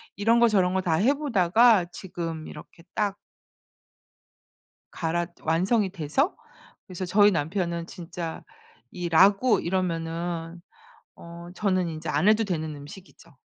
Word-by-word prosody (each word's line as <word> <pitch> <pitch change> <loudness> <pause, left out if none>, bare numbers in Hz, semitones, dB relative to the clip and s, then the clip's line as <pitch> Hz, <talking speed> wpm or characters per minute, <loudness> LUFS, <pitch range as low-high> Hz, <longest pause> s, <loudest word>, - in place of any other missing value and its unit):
이런 225 +4 +3
거 235 - +6
저런 190 -4 +2
거 190 - +1
다 165 -4 +1
해 235 - +3
보다가 225 - +3
지금 165 -4 -6
이렇게 160 +2 -12
딱 205 -2 0 1.7
갈았 170 +1 -2
완성이 190 +6 +1
돼서 180 - -1 0.5
그래서 185 0 -6
저희 205 +3 +5
남편은 170 0 -2
진짜 170 -2 -7 0.5
이 175 -1 -4
라구 195 +8 +4
이러면은 170 -1 -3 0.6
어 170 +1 -11
저는 185 -4 0
인제 155 -1 -6
안 195 - +1
해도 220 +1 +4
되는 160 -6 -3
음식이죠. 145 +1 -14
180 Hz, 245 characters per minute, -26 LUFS, 165-205 Hz, 1.7 s, 거